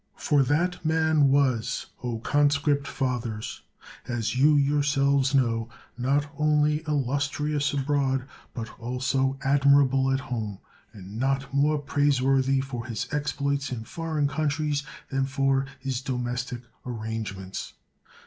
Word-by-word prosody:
For 145 -2 +2
that 165 +7 +1
man 160 -2 +3
was, 135 -5 +1 0.2
O 120 -2 -2
con 145 +5 +3
script 145 0 +1
fathers, 120 -5 -3 0.5
as 115 -1 -2
you 145 +4 +5
yourselves 140 -1 +2
know, 115 -3 +1 0.3
not 135 +4 +1
only 150 0 +3
illustrious 145 +1 0
abroad, 135 -2 0 0.3
but 115 0 -7
also 130 +2 0
admirable 135 -1 +4
at 135 0 +1
home; 110 -7 -4 0.3
and 100 0 -9
not 135 +1 0
more 150 +2 +3
praiseworthy 135 -2 +2
for 125 -3 -6
his 115 0 -3
exploits 140 -1 -1
in 115 -3 -4
foreign 155 +2 -2
countries, 150 0 0 0.3
than 135 0 0
for 135 0 +1
his 130 -1 -3
domestic 125 -1 -3 0.2
arrange 110 -4 -4
ments. 95 0 -7
135 Hz, 120 wpm, -26 LUFS, 125-145 Hz, 0.5 s, you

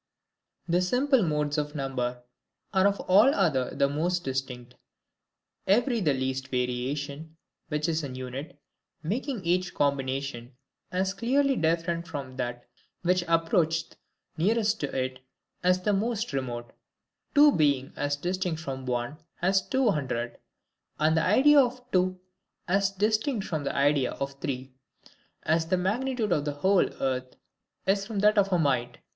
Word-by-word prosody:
The 175 +1 +2
SIMPLE 255 +7 +2
MODES 150 -3 0
of 150 +1 -4
NUMBER 125 -3 -3 0.5
are 190 0 +5
of 200 0 0
all 210 +9 +5
other 145 -10 +1
the 140 0 +3
most 170 +5 -1
distinct; 130 -2 -4 0.9
every 235 +5 +3
the 150 -6 +2
least 130 0 -2
variation, 140 +5 -3 0.3
which 150 +1 -1
is 160 -1 0
an 130 -3 -5
unit, 130 +3 -7 0.4
making 225 - -3
each 180 +2 0
combination 135 -3 -1 0.4
as 190 +1 0
clearly 265 +7 +2
different 170 0 0
from 135 -4 -6
that 120 -1 -4 0.4
which 180 0 +2
approacheth 165 -1 +1 0.4
nearest 215 +5 +2
to 145 - -1
it, 130 0 -2 0.4
as 180 0 +3
the 210 - +2
most 220 -2 -1
remote; 120 -3 -4 0.6
two 295 +1 +8
being 140 - +1
as 145 0 -1
distinct 175 +1 -2
from 135 -4 -6
one, 125 +4 -2 0.2
as 190 +2 +3
two 260 +1 +1
hundred; 125 -7 -3 0.6
and 155 +1 +3
the 160 - +2
idea 285 +9 +6
of 250 -1 +2
two 185 0 +1 0.5
as 195 +1 +2
distinct 215 +3 0
from 155 -4 -3
the 140 - -2
idea 140 -2 +2
of 140 0 -5
three, 130 -4 -4 0.7
as 160 +1 +1
the 185 +2 +2
magnitude 220 +4 -1
of 150 - +2
the 145 - -1
whole 185 +6 +3
earth 130 -1 -2 0.5
is 195 +1 +1
from 220 -2 -5
that 210 +1 +4
of 195 0 +2
a 180 - +4
mite. 130 -6 0
160 Hz, 145 wpm, -27 LUFS, 135-195 Hz, 0.9 s, two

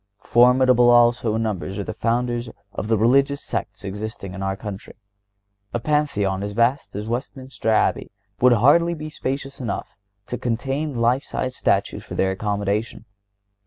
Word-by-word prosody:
Formidable 125 +2 +4
also 120 -2 +4
in 115 - 0
numbers 95 -2 -3
are 100 - -2
the 110 - -5
Founders 120 +1 -1 0.2
of - - -4
the 110 0 +2
religious 135 +6 +3
sects - - -4
existing 100 -1 -6
in 95 - -7
our 95 0 -1
country. 105 -2 -8 0.8
A - - +1
Pantheon 115 -9 0
as 100 0 -4
vast 120 +4 +1
as 105 +1 -4
Westminster 125 -1 -4
Abbey 110 - +1 0.3
would 125 0 +6
hardly 160 +9 +4
be 155 0 -6
spacious 135 -1 -4
enough 120 - -4 0.3
to 125 - -5
contain 135 +5 -2
life 120 +3 +3
sized 130 -3 -4
statues - - 0
for - - -8
their 95 - +1
accommodation. 105 +3 -2
120 Hz, 155 wpm, -22 LUFS, 105-130 Hz, 0.8 s, would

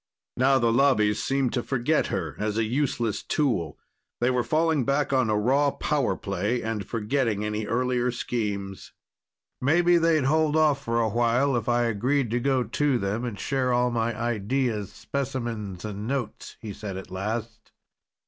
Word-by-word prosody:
Now 135 +2 +4
the 115 -2 +2
Lobbies 110 -6 +3
seemed 135 -2 0
to 125 - 0
forget 135 +5 0
her 80 -5 -3
as 105 0 -1
a 115 - +2
useless 120 -2 -1
tool. 115 - -1 0.4
They 120 +2 +2
were 125 -1 +1
falling 160 0 +1
back 140 +2 0
on 130 -4 +2
a 105 - +2
raw 135 +7 +3
power 145 -1 0
play 105 +5 -2
and 115 -2 -2
forgetting 115 -1 -1
any 105 0 -3
earlier 125 +1 0
schemes. 105 -5 -4 0.7
"Maybe 175 +6 +4
they'd 165 -3 +3
hold 155 +2 +2
off 150 -3 +3
for 115 0 0
a 115 - +2
while 120 +4 +2
if 120 -1 -1
I 120 0 +3
agreed 120 +3 0
to 120 - +1
go 130 0 +1
to 135 +4 +1
them 105 +2 -2
and 115 -5 -4
share 130 -2 0
all 125 0 +2
my 115 -1 -1
ideas, 115 -1 -1
specimens 120 -9 -4
and 105 0 -5
notes," 130 -5 -4
he 105 -3 -7
said 100 -3 -6
at 95 - -9
last. 110 +4 -4
120 Hz, 165 wpm, -26 LUFS, 110-135 Hz, 0.7 s, Now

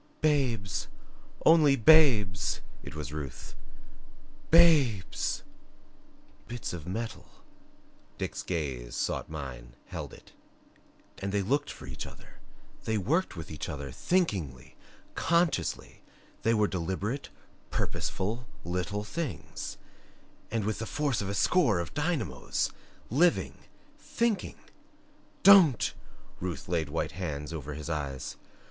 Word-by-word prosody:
"Babes! 130 -10 +1 0.6
Only 155 -4 +7
babes!" 115 -8 +5 0.2
It 70 - -9
was 75 -1 -5
Ruth 70 -5 -6 0.9
"BABES!" 150 - +4 1.0
"Bits 120 -5 -4
of 85 -2 -6
metal" 110 +5 -4 0.9
Dick's - - -3
gaze 70 -9 -3
sought - - -1
mine, 65 -6 -7
held - - -5
it - - -15 0.9
"and 100 0 -2
they 100 0 +1
looked 140 +8 +1
for - - -10
each 65 -1 -6
other, - - -14 0.5
they 110 -1 +1
worked 155 - +1
with 80 -2 -7
each 75 +1 -5
other 70 -3 -5
THINKINGLY, 85 - -1 0.4
CONSCIOUSLY 165 - +1 0.4
they 115 - +3
were 105 -1 +3
deliberate, 95 - -2 0.4
purposeful 110 +6 -2 0.2
little 90 +4 -2
things 155 +6 -5 0.7
and 110 -3 -1
with 110 0 -1
the 110 - -3
force 145 -7 0
of 100 - -3
a 100 - -2
score 140 - +4
of 85 - -4
dynamos 150 - -1 0.4
living, 170 +8 +2 0.3
THINKING 230 -4 -1 0.5
" - - -32
"Don't!" 190 - +7 0.5
Ruth 90 -2 -4
laid 80 -4 0
white 80 - -1
hands 75 -4 -4
over 75 -2 -5
his 75 +1 -6
eyes. 70 -5 -3
100 Hz, 115 wpm, -30 LUFS, -, 1.0 s, Only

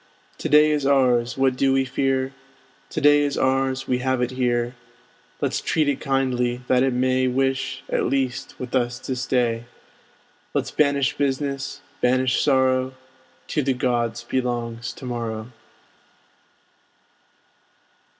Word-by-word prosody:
To - - -3
day 150 +1 +6
is 150 -2 0
ours, 125 -4 +3
what 135 -1 +2
do 135 +1 +2
we 135 0 +2
fear? 135 0 0 0.6
To - - -3
day 145 0 +5
is 145 -1 -1
ours; 135 0 +1
we 125 -1 +1
have 130 0 0
it 125 0 0
here: 120 -1 0 0.7
Let's - - 0
treat 155 -2 +1
it 140 -2 0
kindly, 125 -3 0
that 125 -1 +3
it 135 0 +2
may 130 +1 +1
Wish, 135 +1 -1
at - - 0
least, 135 -2 -2
with 125 -1 -6
us 120 -1 +1
to 130 +1 -4
stay. 120 -2 0 0.9
Let's - - -1
banish 140 -3 +2
business, 140 -1 -2 0.2
banish 130 0 +2
sorrow; 130 -1 +2 0.5
To 150 - 0
the 135 -1 0
gods 120 -2 -1
belongs 120 -1 -2
to 130 - -10
morrow. 115 -1 -4
130 Hz, 135 wpm, -23 LUFS, 125-135 Hz, 0.9 s, day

